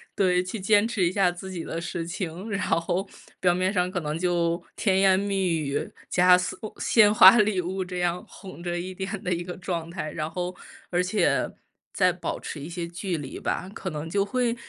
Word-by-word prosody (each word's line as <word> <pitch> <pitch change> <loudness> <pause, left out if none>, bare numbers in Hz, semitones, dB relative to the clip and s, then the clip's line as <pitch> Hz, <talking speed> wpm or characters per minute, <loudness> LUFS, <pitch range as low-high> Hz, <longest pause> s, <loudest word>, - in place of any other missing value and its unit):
对， 180 -2 +3
去 185 +4 -5
坚 205 +3 +4
持 210 -5 -1
一 170 - 0
下 190 -2 +3
自 175 +2 -8
己 175 -3 -5
的 165 - -4
事 170 0 -4
情。 175 +4 -5
然 200 - -1
后 175 +4 0 0.3
表 180 -1 +3
面 185 +2 0
上 180 -1 +1
可 180 - -2
能 150 0 -3
就 170 -1 0
甜 190 -3 +2
言 190 -1 +5
蜜 195 -2 0
语， 145 -2 -2 0.2
加 180 0 +6
鲜 180 - -3 0.2
鲜 210 -3 +5
花 200 +2 +9
礼 210 -3 +2
物 185 +2 -3
这 180 0 -5
样 175 0 0
哄 185 -3 -11
着 175 0 -2
一 185 +2 -5
点 190 +2 -5
的 180 - 0
一 175 0 -2
个 180 0 -7
状 170 -3 -4
态。 160 -3 -5
然 155 0 -3
后 180 +2 -4 0.4
而 175 0 +2
且 190 +4 +1 0.4
再 185 -2 +3
保 175 -2 -4
持 150 - -6
一 145 - -7
些 170 -1 -4
距 175 +1 -3
离 140 -3 -7
吧， 185 - -2
可 190 - -5
能 155 +1 -5
就 200 +2 +1
会 240 +2 0
180 Hz, 230 characters per minute, -26 LUFS, 170-195 Hz, 0.4 s, 花